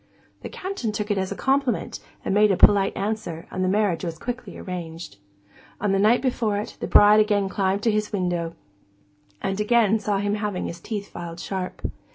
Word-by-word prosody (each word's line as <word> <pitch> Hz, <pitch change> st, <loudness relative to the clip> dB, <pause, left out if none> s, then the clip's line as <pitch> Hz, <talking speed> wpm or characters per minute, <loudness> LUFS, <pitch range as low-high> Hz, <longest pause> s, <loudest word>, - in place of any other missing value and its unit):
The -, -, -6 dB
Captain 370 Hz, -, -4 dB
took 210 Hz, 0 st, -3 dB
it 205 Hz, -, +1 dB
as 190 Hz, 0 st, -2 dB
a -, -, -3 dB
compliment, 270 Hz, -2 st, 0 dB, 0.3 s
and -, -, 0 dB
made 210 Hz, +1 st, +5 dB
a 190 Hz, -, +2 dB
polite 200 Hz, -1 st, +5 dB
answer, 200 Hz, -6 st, -3 dB
and 185 Hz, -, -2 dB
the -, -, +1 dB
marriage 200 Hz, -4 st, +1 dB
was 165 Hz, -2 st, -4 dB
quickly 245 Hz, +7 st, -6 dB
arranged. 165 Hz, -, -7 dB, 0.6 s
On 205 Hz, -1 st, 0 dB
the 195 Hz, -, +2 dB
night 220 Hz, +6 st, +4 dB
before 230 Hz, -5 st, 0 dB
it, 205 Hz, -, -5 dB
the -, -, -3 dB
bride 210 Hz, +1 st, +7 dB
again 205 Hz, -2 st, +2 dB
climbed 195 Hz, +1 st, 0 dB
to 230 Hz, -, +3 dB
his 210 Hz, 0 st, -1 dB
window, 175 Hz, -4 st, -2 dB, 0.9 s
and 195 Hz, +1 st, -1 dB
again 220 Hz, 0 st, +3 dB
saw 205 Hz, -1 st, 0 dB
him 205 Hz, +1 st, 0 dB
having 210 Hz, -3 st, -2 dB
his 170 Hz, -, -6 dB
teeth 205 Hz, +2 st, -5 dB
filed 170 Hz, -1 st, -7 dB
sharp. 185 Hz, 0 st, -5 dB
205 Hz, 195 wpm, -24 LUFS, 185-215 Hz, 0.9 s, bride